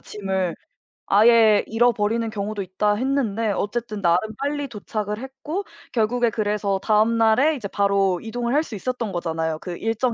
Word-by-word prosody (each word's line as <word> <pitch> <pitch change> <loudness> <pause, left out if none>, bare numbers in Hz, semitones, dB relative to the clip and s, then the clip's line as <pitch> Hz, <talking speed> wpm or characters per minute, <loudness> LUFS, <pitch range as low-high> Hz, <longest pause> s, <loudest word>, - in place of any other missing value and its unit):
짐을. 190 -4 -3 0.5
아예 220 0 +5
잃어버리는 225 -1 +1
경우도 210 -1 -4
있다 195 +3 0
했는데 230 -4 0
어쨌든 215 +1 -3
나름 180 +5 +2
빨리 285 0 -2
도착을 210 -1 -4
했고 280 +9 -5 0.3
결국에 240 +1 +1
그래서 205 -2 -1
다음 220 +1 +3
날에 250 +8 +4
이제 220 -7 -5
바로 195 -3 +1
이동을 240 +2 -3
할 305 - +3
수 230 - -8
있었던 235 +1 -3
거잖아요, 160 -3 -2
그 175 -2 -6
일정에 225 +2 -1
215 Hz, 350 characters per minute, -23 LUFS, 200-240 Hz, 0.5 s, 아예